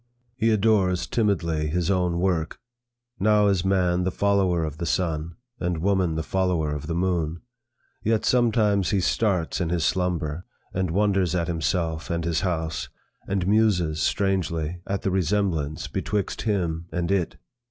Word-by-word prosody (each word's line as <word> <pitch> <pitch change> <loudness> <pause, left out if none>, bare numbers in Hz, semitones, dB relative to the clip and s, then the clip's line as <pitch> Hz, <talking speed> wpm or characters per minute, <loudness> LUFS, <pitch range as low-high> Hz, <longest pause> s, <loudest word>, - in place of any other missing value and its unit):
He 115 -1 +1
adores 100 -4 +2
timidly 85 -9 0
his 85 +4 0
own 90 -2 +1
work. 85 -4 0 0.6
Now 105 +1 +4
is 95 -3 +2
man 90 -2 +2
the 95 - +1
follower 95 -4 +2
of 75 -1 -5
the 85 - -2
sun, 80 -1 -1 0.2
and 90 -1 -1
woman 90 -1 +1
the 80 - -2
follower 90 -5 0
of 75 0 -5
the 85 - -2
moon. 85 -2 -1 0.6
Yet 110 0 +1
sometimes 110 -6 +3
he 100 - +2
starts 95 -2 0
in 85 - 0
his 85 -1 0
slumber, 90 -3 -1 0.3
and 95 -1 0
wonders 95 -1 +1
at 85 -2 0
himself 80 -1 -1
and 85 -1 -1
his 85 -1 0
house, 80 -4 -2 0.4
and 95 -2 -1
muses 95 -7 +2
strangely 90 -4 0
at 100 0 -2
the 95 - 0
resemblance 90 -5 0
betwixt 105 -2 -2
him 85 -6 -1
and 90 0 -1
it. 95 -4 0
90 Hz, 150 wpm, -25 LUFS, 80-100 Hz, 0.6 s, Now